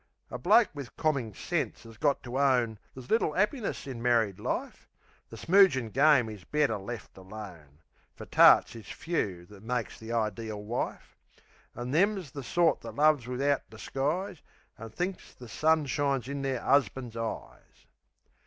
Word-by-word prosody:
A - - -5
bloke 235 - +5
wiv 140 -4 -8
commin 140 -8 0
sense - - -3
'as 115 0 -12
got 140 +3 +1
to 130 +2 -4
own 125 -6 +2 0.2
There's 130 -2 -10
little 220 -8 +2
'appiness 210 +4 -1
in 130 -4 -6
married 115 -5 +2
life. - - -4 0.4
The 115 - -10
smoogin' 165 - +4
game 140 -3 +5
is 105 -4 -9
better 145 -5 0
left 105 +3 -8
alone, 90 -7 -11 0.3
Fer - - -9
tarts - - +6
is 115 - -11
few 100 - -3
that 100 +1 -15
makes 120 +1 -3
the 110 - -10
ideel 110 -2 -2
wife. 115 +4 -4 0.6
An' 120 +1 -5
them's 185 -1 +1
the 140 - -6
sort 170 +6 +1
that - - -9
loves 150 -4 +3
wivout 135 +3 -1
disguise, 165 +7 -3 0.3
An' 115 +1 -9
thinks 180 - -5
the 125 - -12
sun 155 +5 +2
shines 135 -2 -1
in 140 0 -4
their 135 -3 -2
'usban's' 130 -4 +1
eyes. 115 -1 -7
125 Hz, 155 wpm, -29 LUFS, 110-150 Hz, 0.6 s, tarts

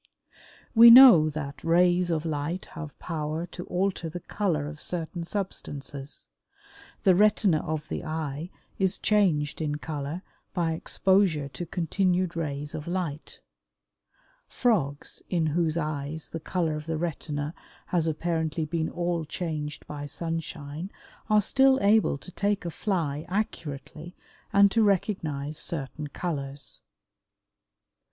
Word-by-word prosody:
We 235 0 +10
know 235 -11 +10
that 140 -3 -6
rays 175 +1 +3
of 160 -1 -1
light 160 +3 -2
have 155 -3 -8
power 155 0 -3
to 175 0 -8
alter 180 -2 -1
the 175 +3 -6
color 175 -7 -1
of 150 0 -8
certain 170 0 -3
substances. 145 - -5 0.8
The 190 - +6
retina 200 -3 +4
of 155 0 -4
the - - -4
eye 155 0 -4 0.3
is 190 0 +1
changed 165 -9 +2
in 150 -2 -1
color 150 +3 -5 0.3
by 170 -3 +1
exposure 175 -2 +2
to 175 +4 -6
continued 180 +1 0
rays 145 -3 -3
of 150 - -6
light. 170 -4 -4 1.1
Frogs 160 - 0
in 170 -3 +1
whose 160 +1 +1
eyes 155 -1 -3
the 165 - -5
color 165 -1 -1
of 150 +1 -7
the 160 -1 -1
retina 150 -2 -3 0.3
has 170 -3 0
apparently 160 0 -1
been 160 0 -1
all 175 -1 -1
changed 155 -2 -4
by 145 -1 -6
sunshine 165 +1 -5 0.4
are 210 -1 +5
still 265 +4 +4
able 210 -6 +3
to 180 - -12
take 205 0 -1
a 170 - -2
fly 160 -7 -1
accurately 160 -4 -4 0.4
and 200 -1 +6
to 225 - +3
recognize 160 -8 0
certain 150 -1 -3
colors. 140 -3 -5
165 Hz, 130 wpm, -27 LUFS, 150-180 Hz, 1.1 s, We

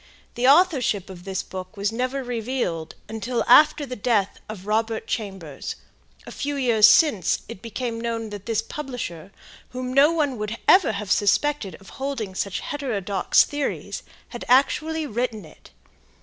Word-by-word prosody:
The 245 +1 +1
authorship 270 - +3
of 180 -1 -12
this 190 -1 -3
book 185 +2 -8
was 200 +1 0
never 255 +3 -2
revealed 230 -9 -3
until 225 +2 -2
after 300 -1 +6
the 255 -2 -6
death 210 -3 0
of 200 -3 -8
Robert 220 +1 -1
Chambers, 190 - -5 0.5
a - - -9
few 290 0 -3
years 235 -6 +5
since, 285 - +3
it 185 - -9
became 230 +1 -4
known 230 -2 -3
that 205 -1 -8
this 225 -2 0
publisher, 235 - -6 0.4
whom 255 0 -5
no 280 +4 +6
one 290 -7 0
would 210 +2 -3
ever 365 - +6
have 200 -2 -4
suspected 205 - +1
of 195 - -15
holding 260 -8 -3
such 195 +1 -3
heterodox 205 -10 +1
theories, 290 0 -4 0.3
had 240 - -7
actually 310 +5 +2
written 230 - -3
it. 155 - -17
230 Hz, 150 wpm, -24 LUFS, 200-270 Hz, 0.5 s, after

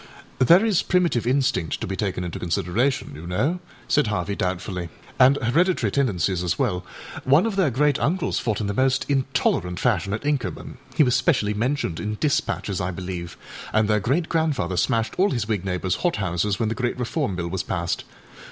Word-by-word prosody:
â 130 - +3
âThere 180 +6 +7
is 210 -6 +3
primitive 170 -10 +1
instinct 125 - +1
to - - -3
be 95 - -3
taken 95 -3 -2
into 90 -2 -5
consideration, 105 +11 0
you 80 +4 -9
know,â 140 - 0 0.3
said 150 -6 +2
Harvey 100 -1 -1
doubtfully, 90 -1 -3 0.3
âand 135 +2 +6
hereditary 170 +10 +2
tendencies 95 -9 0
as 85 -1 -1
well. 90 0 0 0.4
One 140 +8 +4
of 225 -3 -1
their 190 -6 +3
great 140 +3 +2
uncles 180 +4 0
fought 110 -4 -1
in 105 - -2
the 100 - -1
most 130 +3 +1
intolerant 130 -10 0
fashion 100 -6 +1
at 105 - -2
Inkermanâhe 145 +1 -1
was 125 - +2
specially 125 -6 +2
mentioned 115 - -1
in 105 +4 -3
dispatches, 145 - 0
I 90 0 -1
believeâand 90 +4 -4
their 105 0 +2
great 140 - 0
grandfather 155 - 0
smashed 115 +2 +1
all 195 +2 +4
his 120 - -2
Whig 105 -5 -1
neighboursâ 90 0 -1
hot 175 -2 0
houses 95 +1 -1
when 110 - +1
the - - -1
great 125 +1 -2
Reform 125 - -2
Bill 85 -1 -3
was 95 +1 -2
passed. 85 -1 -2
110 Hz, 185 wpm, -23 LUFS, 90-140 Hz, 0.4 s, âThere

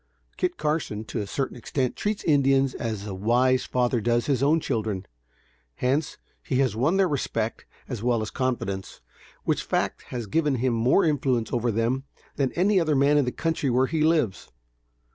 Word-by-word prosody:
Kit 360 -1 -1
Carson, 150 -9 -1
to 110 - -4
a 100 - -5
certain 135 +5 -2
extent, 125 +1 -2
treats 210 0 -2
Indians 135 -3 +3
as 110 -4 -4
a 100 - -5
wise 125 +6 +2
father 125 -2 +1
does 120 +1 +1
his 135 -4 +1
own 150 +4 +4
children; 110 -9 -2 0.7
hence, 140 +5 0 0.2
he 130 - -3
has 130 -5 +2
won 145 +11 +2
their 195 -1 +4
respect 115 -7 -2 0.2
as 120 -6 -5
well 120 -2 +1
as 110 - -5
confidence, 105 -7 -3 0.4
which - - 0
fact - - -1
has 120 -3 -4
given 150 +6 +1
him 125 0 0
more 120 +12 +3
influence 135 -6 0
over 120 -1 +1
them, 115 +5 0 0.3
than 135 -2 0
any 190 +3 +3
other 155 -3 +1
man 140 +2 +4
in 140 - +2
the 125 - -1
country 165 -3 -1
where 125 +2 +3
he 160 +3 -1
lives. 155 - +1
130 Hz, 180 wpm, -25 LUFS, 115-145 Hz, 0.7 s, own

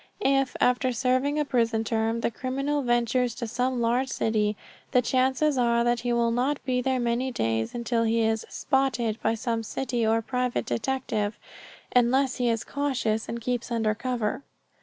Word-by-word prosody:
If, 270 -1 +2
after 250 +1 +2
serving 255 +4 +1
a 300 - +1
prison 230 -4 +1
term, 225 +1 0
the - - 0
criminal 275 +5 -2
ventures 240 -1 +1
to 240 - -4
some 250 +2 -1
large 240 +3 +1
city, 215 -3 0 0.4
the 250 - +5
chances 260 +3 +2
are 235 -1 +3
that 240 0 +1
he 240 0 -2
will 235 -1 +2
not 260 +5 +1
be 250 -1 +1
there 260 0 0
many 240 +2 0
days 110 - -1
until 235 -1 0
he 230 0 +2
is 220 0 +1
"spotted" 240 -5 0
by 225 - +1
some 230 0 -2
city 240 +1 -2
or 225 +1 +2
private 250 +1 -1
detective, 210 - -2 0.6
unless 255 +2 +3
he 245 -1 +1
is 230 -1 0
cautious 255 -6 -1
and 235 0 -4
keeps 245 0 -2
under 225 -2 +1
cover. 240 +1 -2
240 Hz, 170 wpm, -26 LUFS, 225-255 Hz, 0.6 s, the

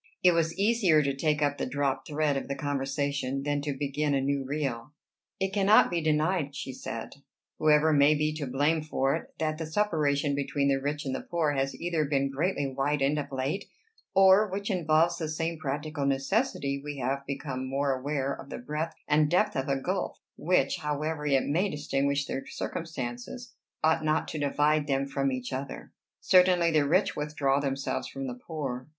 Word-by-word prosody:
It 180 - +7
was 165 0 0
easier 200 -7 +4
to 140 -1 -1
take 150 +1 +1
up 145 0 0
the - - 0
dropped 140 0 -1
thread 150 -1 0
of 135 - -3
the 140 - -3
conversation 140 -1 -2
than 145 0 0
to 145 -2 -3
begin 145 +1 0
a - - +2
new 140 0 0
reel. 135 -2 -3 0.5
"It 195 0 -1
cannot 200 0 +5
be 170 -1 0
denied," 155 -1 +1
she 135 - -5
said, 115 0 -7 0.4
"whoever 155 0 +4
may 145 +1 +5
be 150 +1 0
to 145 -3 -3
blame 145 +5 +1
for 135 -2 0
it, 165 - -7
that 155 0 -1
the 160 - -3
separation 155 -6 +1
between 140 0 0
the 135 -1 +1
rich 145 +1 -2
and 135 - -2
the - - -3
poor 165 -3 0
has 135 -1 -1
either 170 -2 0
been 140 -1 0
greatly 145 +1 0
widened 140 +2 0
of 145 - -5
late, 135 +9 -2 0.5
or, 195 +2 +6
which 200 +3 -3
involves 170 -1 +2
the 160 -2 -3
same 165 +1 -2
practical 145 0 -2
necessity, 140 - 0
we 145 -1 -5
have 135 +2 -2
become 135 -2 -4
more 135 0 +1
aware 140 +1 -2
of 140 - -10
the - - -5
breadth 150 +6 -4
and 150 0 +3
depth 185 +5 +2
of 135 +1 -1
a 135 -1 +1
gulf 185 +8 -2 0.2
which, 160 -5 +1
however 150 0 -2
it 135 -2 +3
may 180 +8 +1
distinguish 140 -2 0
their 135 - -5
circumstances, 160 - -5 0.3
ought 160 0 +3
not 155 0 +1
to 155 - -4
divide 145 +1 +2
them 135 -1 +1
from 135 0 -1
each 125 0 -4
other. 135 +1 -6 0.3
Certainly 180 -2 +4
the 150 -3 +3
rich 180 +7 +2
withdraw 150 -2 0
themselves 135 -1 -2
from 135 0 -6
the 125 - -4
poor. 130 -1 -5
145 Hz, 185 wpm, -28 LUFS, 135-160 Hz, 0.5 s, It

